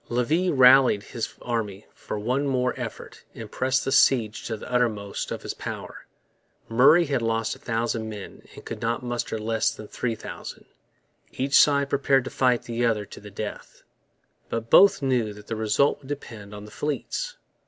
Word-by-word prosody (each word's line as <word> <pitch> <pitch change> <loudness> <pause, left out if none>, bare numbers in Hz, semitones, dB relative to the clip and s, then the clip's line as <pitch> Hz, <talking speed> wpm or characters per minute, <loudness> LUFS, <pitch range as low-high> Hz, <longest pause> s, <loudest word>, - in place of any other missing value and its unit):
Levis 150 +10 +1
rallied 130 - +6
his 115 +1 -5
army 110 -4 -3
for - - -6
one 125 +7 -1
more 125 -2 +1
effort - - -8
and - - -9
pressed 130 +1 0
the 135 - -1
siege 115 -6 +3
to 110 - -3
the 105 - -10
uttermost 110 -5 -1
of - - -5
his - - -4
power. - - -8 0.6
Murray 135 +9 +5
had 140 -4 -1
lost 115 0 -1
a - - -17
thousand 115 -1 -2
men 105 -2 -9
and - - -12
could - - -6
now 115 +1 0
muster 120 -2 -3
less 110 +1 0
than 105 - -9
three 115 +1 -3
thousand. - - -9 0.7
Each 135 +2 -3
side 140 -1 +5
prepared 135 -1 +3
to - - -7
fight 125 -2 +2
the 120 0 -3
other 110 -3 +1
to - - -12
the 105 - -11
death. 105 +1 -7 0.7
But 115 0 -4
both 200 -7 +7
knew 125 -5 +1
that 105 0 -13
the 115 - -4
result 110 +6 +1
would 135 - -16
depend 110 -8 -7
on 105 0 -9
the 105 - -13
fleets. - - -3
120 Hz, 180 wpm, -25 LUFS, 110-135 Hz, 0.7 s, both